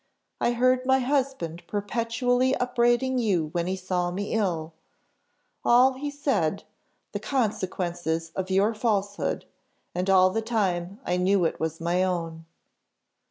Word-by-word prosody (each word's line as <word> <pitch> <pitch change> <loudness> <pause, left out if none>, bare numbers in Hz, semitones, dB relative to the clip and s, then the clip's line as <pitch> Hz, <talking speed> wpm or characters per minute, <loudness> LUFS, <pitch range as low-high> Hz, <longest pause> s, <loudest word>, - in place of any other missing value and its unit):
I 240 - +2
heard 255 +1 +3
my 265 +1 +4
husband 260 - -1
perpetually 230 +5 0
upbraiding 250 +1 +1
you 185 -9 +1
when 170 +1 -1
he 185 - -1
saw 185 -1 -1
me 200 +3 -4
ill 170 -7 -1 0.9
all, 250 +2 +5
he 285 +3 -4
said, 260 - -1 0.5
the - - -3
consequences 175 - -2
of 190 0 -3
your 195 +4 +3
falsehood 205 -2 -1 0.5
and 180 +2 -1
all 185 -1 +6
the 225 - -1
time 200 -4 -1
I 180 - 0
knew 185 0 +2
it 160 - -1
was 160 0 -3
my 175 +2 +1
own. 165 -3 -3
200 Hz, 135 wpm, -26 LUFS, 175-245 Hz, 0.9 s, all